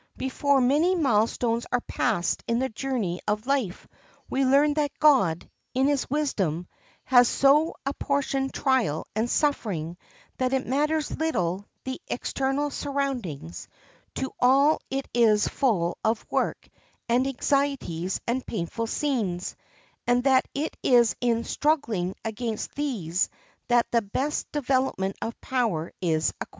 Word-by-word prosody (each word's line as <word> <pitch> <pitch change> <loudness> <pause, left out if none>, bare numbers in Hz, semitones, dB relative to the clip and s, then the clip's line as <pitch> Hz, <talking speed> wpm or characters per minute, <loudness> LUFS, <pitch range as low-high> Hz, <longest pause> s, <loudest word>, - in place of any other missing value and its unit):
Before 275 +1 +1
many 300 +9 +3
milestones 235 - +1
are 245 - +1
passed 210 -10 -1
in 230 - +1
the 265 +2 0
journey 220 -7 -2
of 210 +2 -1
life 260 -9 -1 0.4
we 270 - +1
learn 285 +3 +4
that 295 -1 -1
God, 195 - +4 0.3
in 260 +1 +3
his 285 -1 +1
wisdom, 195 - -1 0.4
has 245 -2 +6
so 290 +6 +3
apportioned 275 -1 -1
trial 250 - +1
and 220 +2 0
suffering 190 - -1 0.4
that 255 0 +1
it 265 -1 0
matters 300 +4 0
little 195 - -1 0.2
the 260 0 -5
external 275 +3 -1
surroundings; 250 - -3 0.5
to 265 - -3
all 275 +5 +5
it 270 +1 -3
is 220 -3 +4
full 200 -11 0
of 220 0 0
work - - -1 0.4
and 250 +3 +2
anxieties 270 - -1
and 250 +2 -1
painful 225 +3 -3
scenes, 220 -11 -1 0.5
and 245 0 +3
that 260 -1 +4
it 295 +3 -2
is 240 -3 +4
in 235 -1 +1
struggling 230 - 0
against 225 0 -3
these 200 - -1 0.4
that 240 -1 +4
the 235 - +3
best 265 +9 -2
development 260 -9 0
of 230 - -4
power 225 -11 -1
is 160 -3 +1
acquired. - - -4
250 Hz, 130 wpm, -26 LUFS, 210-275 Hz, 0.5 s, has